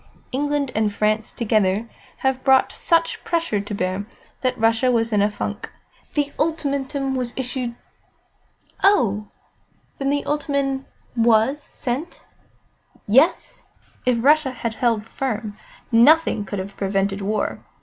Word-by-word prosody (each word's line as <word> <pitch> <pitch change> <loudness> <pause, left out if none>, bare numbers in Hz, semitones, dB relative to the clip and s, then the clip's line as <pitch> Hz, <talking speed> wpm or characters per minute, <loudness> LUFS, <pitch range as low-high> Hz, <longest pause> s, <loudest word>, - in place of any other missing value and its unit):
England 285 0 -1
and 215 -1 +1
France 215 +2 0
together 215 -1 +1 0.4
have 265 -1 +1
brought 265 -1 +4
such 335 -1 +1
pressure 330 -12 0
to 205 +1 -5
bear, 185 +2 -2 0.3
that 255 -1 0
Russia 225 +3 +3
was 230 -1 +1
in 205 - +3
a 205 - +3
funk. 210 - -5 0.4
The 290 -1 +1
ultimatum 280 -3 -1
we 255 -1 -1
issued 250 -2 -3 0.6
" - - -29
"Oh, 210 - 0 0.7
then, 275 0 0
the 285 0 0
ultimatum 280 -2 -1 0.3
was 230 +4 +3
sent?" 270 +5 -5 0.8
"Yes. 265 - +2 0.4
If 240 -2 +1
Russia 300 0 +5
had 235 -3 -4
held 225 -2 0
firm, 225 -4 -3 0.4
nothing 240 -1 +5
could 200 +1 -5
have 195 +1 -6
prevented 195 0 -1
war. 210 +2 -1
245 Hz, 130 wpm, -22 LUFS, 210-275 Hz, 0.8 s, Russia